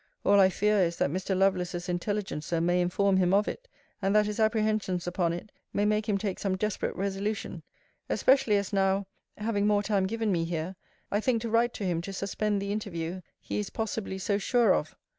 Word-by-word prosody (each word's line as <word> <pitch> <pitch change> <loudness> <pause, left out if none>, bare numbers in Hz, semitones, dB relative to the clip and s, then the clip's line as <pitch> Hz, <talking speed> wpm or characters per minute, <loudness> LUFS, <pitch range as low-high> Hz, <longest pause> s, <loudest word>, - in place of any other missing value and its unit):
All 200 0 +6
I 190 -1 +7
fear 210 +2 +2
is, 170 -2 +1
that - - +1
Mr. 185 +2 -1
Lovelace's 180 -2 +1
intelligencer 175 -3 -2
may 175 +2 +2
inform 190 +2 +2
him 185 0 +3
of 205 +1 +3
it; - - -5 0.3
and 195 +1 +1
that 210 0 +5
his 210 +1 -3
apprehensions 215 -4 +1
upon 175 -1 0
it 175 +5 -6 0.2
may 205 - +1
make 215 +1 +1
him 200 - +2
take 195 -2 -3
some 190 -2 -1
desperate 210 +1 -2
resolution: 200 +2 -3 0.5
especially 255 -6 +3
as 200 0 -3
now 195 0 +2 0.3
(having 210 -1 0
more 205 -1 +3
time 195 -2 +1
given 225 0 -1
me 170 -3 +1
here) 165 +2 -3 0.4
I 205 - +2
think 230 0 0
to 230 - -3
write 235 +1 +2
to - - -5
him 170 -2 0
to 195 +3 -6
suspend 205 +1 -1
the 200 0 -3
interview 185 -4 -4 0.2
he - - -4
is 205 - -3
possibly 220 -3 -3
so 200 +2 0
sure 230 -1 +3
of. 155 - -2
200 Hz, 200 wpm, -28 LUFS, 185-210 Hz, 0.5 s, I